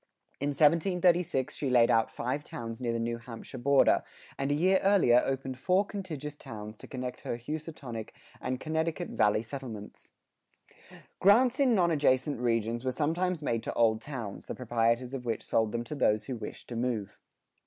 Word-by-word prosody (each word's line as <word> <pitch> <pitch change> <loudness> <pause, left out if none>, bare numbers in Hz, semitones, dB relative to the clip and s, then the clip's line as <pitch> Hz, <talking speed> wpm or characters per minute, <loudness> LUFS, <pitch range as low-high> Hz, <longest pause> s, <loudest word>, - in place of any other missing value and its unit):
In 140 - 0
1736 170 -1 +2
she 140 - -2
laid 120 -2 +5
out 115 0 +3
five 130 +5 -3
towns 115 -2 -7
near 120 -2 0
the 115 - -1
New 115 0 -2
Hampshire 115 0 -9
border, 140 +2 +4 0.3
and 135 0 -2
a - - +3
year 185 +5 +4
earlier 185 -12 +5
opened 135 -1 -3
four 185 +7 +2
contiguous 155 -8 -6
towns 105 -5 -8
to - - -12
connect 125 -1 -5
her 115 - -3
Housatonic 140 -4 -6 0.3
and 130 0 -2
Connecticut 160 +3 -2
Valley 105 +1 +2
settlements.[76:1] 115 -4 -12 0.2
Grants 240 +7 +5
in 260 -4 +4
non 175 -3 +3
adjacent 140 -3 +2
regions 115 -1 0
were 130 - 0
sometimes 165 +4 -1
made 115 -5 0
to - - -4
old 110 -2 +3
towns, 120 -9 -6
the - - -4
proprietors 120 +1 0
of 130 -2 -5
which 115 -2 -2
sold 110 -1 +1
them 115 +1 -2
to 120 - -7
those 105 -7 +2
who 130 - -4
wished 115 - -8
to 120 - -5
move. 115 -4 -2
130 Hz, 175 wpm, -30 LUFS, 115-155 Hz, 0.3 s, laid